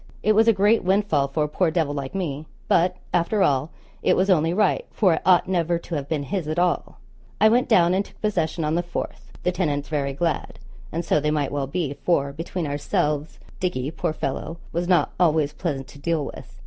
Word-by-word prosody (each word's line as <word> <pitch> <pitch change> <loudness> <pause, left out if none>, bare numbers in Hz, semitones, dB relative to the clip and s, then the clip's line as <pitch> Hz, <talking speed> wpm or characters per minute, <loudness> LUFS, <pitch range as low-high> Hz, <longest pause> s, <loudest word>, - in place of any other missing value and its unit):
It 215 - +4
was 220 +2 +4
a - - +8
great 205 +2 +3
windfall 185 -7 +2
for 145 +3 -1
a - - 0
poor 170 +3 +1
devil 160 -3 0
like 140 +1 -5
me; 155 -5 -3 0.2
but, 180 +2 +3 0.2
after 180 +4 +2
all, 140 +2 +2 0.3
it - - +3
was 190 +2 +3
only 165 -2 +3
right, 200 +1 +2
for 190 -6 +3
it 160 - -1
ought 180 -1 +4
never 175 -2 +1
to 170 - -9
have 145 -2 -3
been 150 -3 -1
his 180 +1 -3
at 155 +1 -2
all. 175 0 0 0.4
I 215 - +6
went 245 +3 +2
down 180 -5 +5
and 190 +2 +2
took - - -19
possession 165 -6 -1
on 150 - 0
the 170 - +2
4th, 175 0 -6
the 180 - +2
tenants 150 -6 -1
very 140 -3 -1
glad, 165 +3 -2 0.3
and 165 +1 -3
so - - +3
they 150 +1 0
might 150 -2 0
well 140 -1 -2
be; 150 -1 -2
for, 140 -3 0
between 165 +3 -4
ourselves, 150 +1 -1 0.2
Dickie, 150 -7 -2
poor 160 - -2
fellow, 155 +2 -4 0.2
was 175 +1 -1
not 180 -1 +3
always 155 -4 +3
pleasant 140 -6 -3
to 140 - -13
deal 160 -1 0
with. - - -10
165 Hz, 215 wpm, -24 LUFS, 145-180 Hz, 0.4 s, a